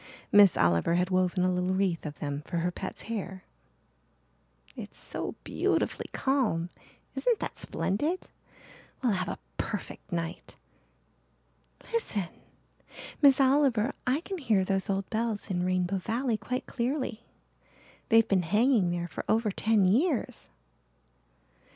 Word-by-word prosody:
Miss 205 -2 +7
Oliver 85 - +3
had 180 +1 +1
woven 185 0 +2
a 185 0 +2
little 180 +1 0
wreath 185 -5 0
of 145 - -7
them 145 -1 -3
for 175 - -2
her 175 +2 0
pet's 190 +2 -6
hair. 195 -4 -5 1.3
"It's - - -9
so - - -4
beautifully - - 0
calm 220 -11 0 0.4
isn't 485 -3 +1
that - - -5
splendid? 300 - -1 0.8
We'll 245 - +3
have 185 -2 -1
a - - -4 0.2
perfect 205 - -5
night. 165 -1 -4 1.4
Listen, 210 - -1 0.9
Miss 275 -2 +7
Oliver 265 -3 +3
I 265 +5 +2
can 380 +1 -5
hear 215 -9 +2
those 195 +1 0
old 195 0 0
bells 220 -2 -1
in 180 -1 0
Rainbow 185 +1 0
Valley 235 +4 -1
quite 250 +4 -3
clearly. 245 -2 -2 0.9
They've 225 -2 +6
been 195 -2 +3
hanging 210 +2 +3
there 175 0 -2
for - - -6
over 220 -1 +2
ten 215 0 +2
years." 255 - +1
200 Hz, 130 wpm, -29 LUFS, 180-245 Hz, 1.4 s, Miss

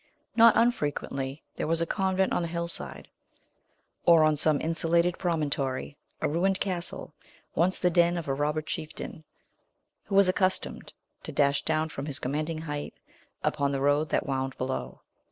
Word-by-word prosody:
Not 230 -1 +7
unfrequently 145 - -1
there - - -2
was 165 +1 +1
a 170 - +1
convent 190 +1 0
on - - +1
the 170 - -2
hillside; 170 0 -1 1.0
or, 165 -2 +6
on 155 0 +4
some 150 0 +3
insulated 170 +2 +1
promontory, 145 -6 -1 0.2
a - - 0
mined 185 +5 +1
castle, 180 -3 -3 0.4
once 180 +3 +2
the 180 - +2
den 175 +1 +3
of 165 - -5
a 135 - 0
robber 150 +2 -1
chieftain, 155 0 -6 0.8
who 195 - -3
was 200 -1 +6
accustomed 185 0 -1 0.3
to - - -7
dash 140 0 +2
down 160 0 0
from 140 -2 -6
his 145 - -3
commanding 155 +4 -2
height 145 -2 -5 0.5
upon 140 -2 +1
the 135 - -1
road 145 +2 +2
that - - 0
wound 135 -1 -2
below. 130 - -4
160 Hz, 155 wpm, -28 LUFS, 145-175 Hz, 1.0 s, Not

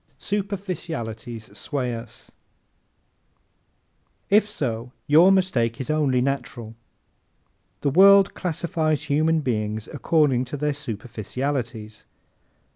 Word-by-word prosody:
Superficialities 165 - -4
Sway 130 -5 -3
Us 115 - -11
¶ - - -40 2.0
If 210 +1 +5
so 125 - -4
your 165 +6 +6
mistake 130 -13 +1
is 130 +3 -2
only 140 -5 +2
natural. 125 -4 -3 1.1
The 140 - +1
world 195 +4 +7
classifies 160 -3 -1
human 155 +2 +2
beings 110 -4 -2
according 145 -6 +1
to 135 +4 -6
their 150 +1 0
superficialities. 120 -2 -5
140 Hz, 95 wpm, -24 LUFS, 115-165 Hz, 2.0 s, world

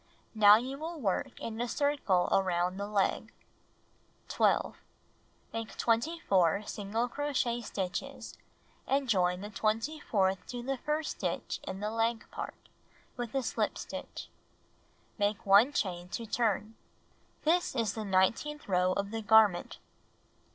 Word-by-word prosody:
Now 210 -2 +8
you 260 +5 -2
will 325 +1 -5
work 195 -8 -2
in 225 0 -5
a 240 - -1
circle 280 -10 +1
around 180 -1 +1
the 200 0 -3
leg. 205 -2 0 1.0
12. - - +2 0.8
Make 225 -1 -5
24 225 - +2
single 215 +4 -2
crochet 250 -3 -1
stitches, 190 -4 -5 0.5
and 275 0 +1
join 180 -4 +2
the 205 +1 -7
twenty 225 +9 -1
fourth 195 -7 0
to 245 -1 -5
the 270 +1 -2
first 300 +3 -1
stitch - - -3
in 190 +1 -5
the 210 +1 -2
leg 225 0 0
part, - - -5 0.6
with 240 0 -5
a 270 - +1
slip - - -1
stitch. - - -7 0.9
Make 205 0 0
1 205 +7 +6
chain 180 -8 -2
to 230 - -7
turn. 220 -1 0 0.7
This 335 -2 +2
is 225 -5 0
the 220 - -4
nineteenth 210 +10 +1
row 185 -1 +2
of 200 +1 -2
the 225 0 -3
garment. 215 -4 +4
220 Hz, 135 wpm, -31 LUFS, 195-245 Hz, 1.0 s, Now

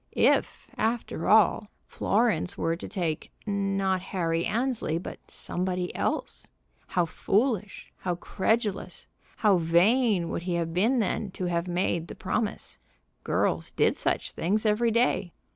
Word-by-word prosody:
If, - - +2
after 225 -6 -1
all, 210 -1 +5 0.2
Florence 210 -6 +1
were 165 0 0
to 170 - -8
take, 170 -7 -3
not 195 -2 0
Harry 170 -3 -1
Annesley, 230 -6 0
but 170 - -7
somebody 180 0 -3
else? - - -2 0.4
How 175 -2 +1
foolish, 210 +3 -1
how 180 -2 -2
credulous, 210 +3 -1 0.3
how 205 -4 +4
vain 180 +3 +3
would - - -3
he 175 0 -2
have 165 -1 -2
been 220 +9 +2
then 215 -1 0
to 185 - -4
have 170 0 -1
made 175 -1 -1
the - - -8
promise! 205 +3 -3 0.4
Girls - - 0
did - - +2
such - - -1
things 210 +6 -1
every 215 +2 +3
day. 225 -6 +1
190 Hz, 135 wpm, -27 LUFS, 175-220 Hz, 0.4 s, all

